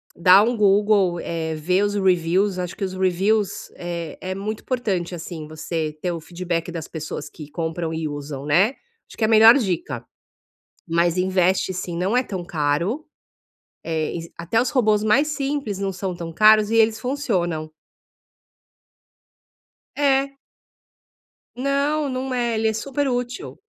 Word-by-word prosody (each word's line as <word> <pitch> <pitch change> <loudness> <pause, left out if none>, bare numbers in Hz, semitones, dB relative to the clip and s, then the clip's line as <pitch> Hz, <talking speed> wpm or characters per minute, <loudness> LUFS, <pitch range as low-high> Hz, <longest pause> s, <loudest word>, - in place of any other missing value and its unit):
dá 185 +3 +7
um 235 +1 0
Google, 200 -3 +3
eh, 160 -1 -3
vê 180 +6 +1
os 205 0 0
reviews, 185 +1 +2
acho 180 -1 -4
que - - -5
os 190 -1 -2
reviews 190 +3 0
é 170 -2 -5
é 185 0 -3
muito 210 +2 -4
importante, 195 -9 -2
assim, 160 -2 -7
você 155 0 -4
ter 180 - -1
o 170 - -4
feedback 170 0 -4
das 165 -3 -6
pessoas 155 -2 -6
que 150 -1 -11
compram 165 0 -3
e 160 -1 -2
usam, 145 -1 -6
né, 180 +9 +4 0.4
acho - - -14
que 225 - -2
é - - +4
a - - -2
melhor 225 +2 +8
dica. 185 -7 -2 0.8
Mas 170 +1 +1
investe 185 0 +2
sim, 175 -1 -4
não 190 +6 0
é 255 - +3
tão 185 -6 -5
caro, 170 - -1 0.8
eh, 160 0 -2
es 165 0 -7
até 195 +7 +1
os 255 - -1
robôs 215 -5 +2
mais 250 +8 +4
simples 275 -7 -2
não 195 -1 -2
são 185 0 -4
tão 170 -1 -7
caros 215 +3 +5
e 230 - +2
eles 220 -1 +3
funcionam. 180 - -2 2.3
É. 275 -1 +2 1.2
Não, 280 +3 0
não 255 0 -3
é, 240 -2 0
ele 220 0 +1
é 220 - +1
super 275 +5 -2
útil. 245 - -3
190 Hz, 155 wpm, -22 LUFS, 170-225 Hz, 2.3 s, melhor